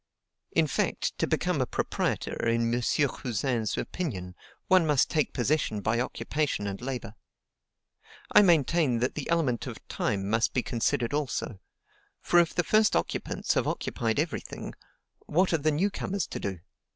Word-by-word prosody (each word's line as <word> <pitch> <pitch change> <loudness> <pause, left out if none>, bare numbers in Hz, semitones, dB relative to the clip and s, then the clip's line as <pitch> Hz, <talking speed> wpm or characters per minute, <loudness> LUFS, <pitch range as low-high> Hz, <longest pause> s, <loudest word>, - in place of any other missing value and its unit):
In 165 - +3
fact, 145 - -1
to - - +1
become - - 0
a - - 0
proprietor, - - -1
in 115 0 +1
M. 120 - +1
Cousin's 120 -4 0
opinion, 95 - -4 0.3
one 185 -3 +5
must 145 -3 +3
take 155 -2 +1
possession 125 -4 0
by 110 +3 0
occupation 140 -1 -1
and 100 +1 -4
labor. 125 -4 -4 1.2
I - - +8
maintain 165 - +3
that 125 +3 0
the 150 - -5
element 150 -8 +1
of - - -6
time 100 -1 -1
must 110 +2 +1
be 125 - +2
considered 120 +1 0
also; 125 -7 -2 0.6
for 175 - +4
if 170 -2 +2
the 175 - +2
first 215 +5 +3
occupants - - -1
have - - +1
occupied 115 +2 -1
every 155 0 -1
thing, - - -8 0.5
what 180 +3 +2
are 165 - +3
the 155 +2 +2
new 175 +7 +1
comers 195 -2 -2
to - - -5
do? 95 -3 -4
135 Hz, 160 wpm, -28 LUFS, 115-160 Hz, 1.2 s, I